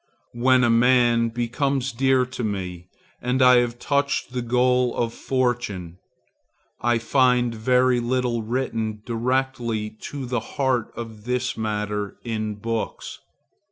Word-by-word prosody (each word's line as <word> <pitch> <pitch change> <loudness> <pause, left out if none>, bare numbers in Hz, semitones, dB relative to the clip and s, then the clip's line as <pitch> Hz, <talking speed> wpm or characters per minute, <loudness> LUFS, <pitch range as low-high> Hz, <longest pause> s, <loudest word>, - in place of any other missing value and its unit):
When 125 +1 +3
a 120 - +4
man 120 -1 +4
becomes 130 +3 -1
dear 130 +1 +2
to 125 0 -6
me 90 -4 -4 0.4
I 125 0 +5
have 120 -1 +1
touched 140 -1 0
the 125 - -1
goal 125 +1 +2
of 115 -1 -1
fortune. 115 -9 -2 0.8
I 120 0 +2
find 125 0 +2
very 125 +2 +2
little 120 -1 0
written 110 -2 -3
directly 120 -2 -1 0.2
to 140 -2 -5
the 125 -1 -1 0.2
heart 130 -5 +1
of 110 -2 -8
this 125 +1 -1
matter 105 -2 -3
in 110 -2 -3
books. 115 +2 -4
120 Hz, 125 wpm, -23 LUFS, 115-125 Hz, 0.8 s, I